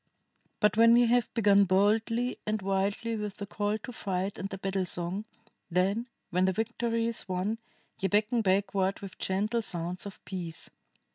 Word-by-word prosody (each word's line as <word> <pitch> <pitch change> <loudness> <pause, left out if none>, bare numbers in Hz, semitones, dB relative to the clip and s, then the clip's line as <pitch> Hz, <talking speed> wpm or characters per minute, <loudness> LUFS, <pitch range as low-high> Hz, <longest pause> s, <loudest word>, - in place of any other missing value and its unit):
"But, 210 0 +3
when 230 +1 +7
ye 240 0 +6
have 240 0 +2
begun 200 -3 +5
boldly 220 +6 +2
and 215 0 0
wildly 200 +4 0
with 210 -2 -4
the 200 - -4
call 205 +1 -1
to 235 +4 -8
fight 195 -2 -2
and 195 - -3
the 195 - -5
battle 190 -1 -1
song, 175 +5 -3 0.4
then, 195 +7 +1 0.2
when 180 +1 +3
the 190 - +2
victory 230 +2 -1
is 230 -4 -2
won, 190 +5 -1 0.4
ye 195 - +1
beckon 215 +4 +2
backward 195 -1 +1
with 195 -2 -9
gentle 210 +5 0
sounds 180 -1 -3
of 200 - -11
peace. 170 -4 -5
200 Hz, 165 wpm, -29 LUFS, 190-225 Hz, 0.4 s, when